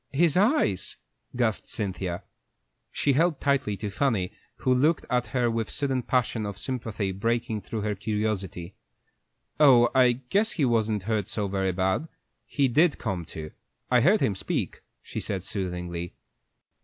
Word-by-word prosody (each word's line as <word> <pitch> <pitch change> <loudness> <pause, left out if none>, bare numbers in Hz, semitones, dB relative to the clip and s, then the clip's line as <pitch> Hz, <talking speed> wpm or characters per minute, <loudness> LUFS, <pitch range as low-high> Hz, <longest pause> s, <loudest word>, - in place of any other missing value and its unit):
"His 155 +2 +3
eyes!" 190 - +2 0.4
gasped 120 -3 0
Cynthia. 95 -4 -3 0.7
She 140 - +1
held 160 +1 +2
tightly 135 -8 +1
to 105 -1 -4
Fanny, 105 -6 0 0.2
who 130 - +1
looked 150 +6 +2
at 125 -1 +1
her 120 -2 +1
with 115 -1 -1
a - - -8
sudden 135 -3 0
passion 120 -2 0
of 100 -2 -5
sympathy 110 -5 -3
breaking 110 +2 -1
through 110 +1 -4
her 105 0 -1
curiosity. 105 -3 -3 0.9
"Oh, 125 -5 +7
I 125 -2 +5
guess 195 - 0
he 150 - +1
wasn't 110 -4 +1
hurt 105 -2 -1
so 105 -2 -1
very 95 -1 0
bad; 95 - 0 0.4
he 140 -2 +2
did 150 +6 +3
come 90 -3 -3
to. 80 0 -7 0.4
I 125 -1 +5
heard 190 - +4
him 120 -7 +2
speak," 95 - -3 0.2
she - - -5
said, 95 -3 -3
soothingly. 90 -3 -4
110 Hz, 155 wpm, -27 LUFS, 95-130 Hz, 0.9 s, Oh